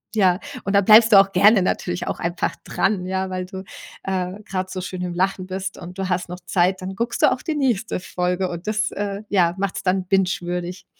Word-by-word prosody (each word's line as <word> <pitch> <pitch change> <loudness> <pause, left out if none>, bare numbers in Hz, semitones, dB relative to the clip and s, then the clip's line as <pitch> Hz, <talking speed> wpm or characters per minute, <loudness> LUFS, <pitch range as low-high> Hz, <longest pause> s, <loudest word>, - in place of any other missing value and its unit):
Ja, 185 -3 +3 0.2
und 195 - -2
dann 200 -1 +4
bleibst 220 +1 +8
du 200 - +9
auch 195 0 +3
gerne 200 +2 +6
natürlich 175 -1 -2
auch - - -3
einfach 170 +1 -2
dran, 190 -3 0
ja, 190 0 -2
weil 185 0 -3
du, 190 0 -8 0.4
äh, 190 +1 -3
grad 185 -1 -4
so 185 0 -5
schön 185 0 -5
im 180 -1 -3
Lachen 185 0 0
bist 190 +1 -5
und 180 +1 -10
du 190 -1 -2
hast 180 -1 -1
noch 180 +1 -6
Zeit, 185 +1 +1
dann 190 +1 -5
guckst 235 +1 -2
du - - +6
auch - - -2
die 315 -3 -3
nächste 235 -9 0
Folge 180 +1 -1
und 175 +2 -7
das, 215 0 0
äh, 205 0 -4
ja, 175 -3 +2
macht's 195 -1 -2
dann 185 0 +1
bingewürdig. 180 -1 -1
190 Hz, 220 wpm, -22 LUFS, 180-200 Hz, 0.4 s, du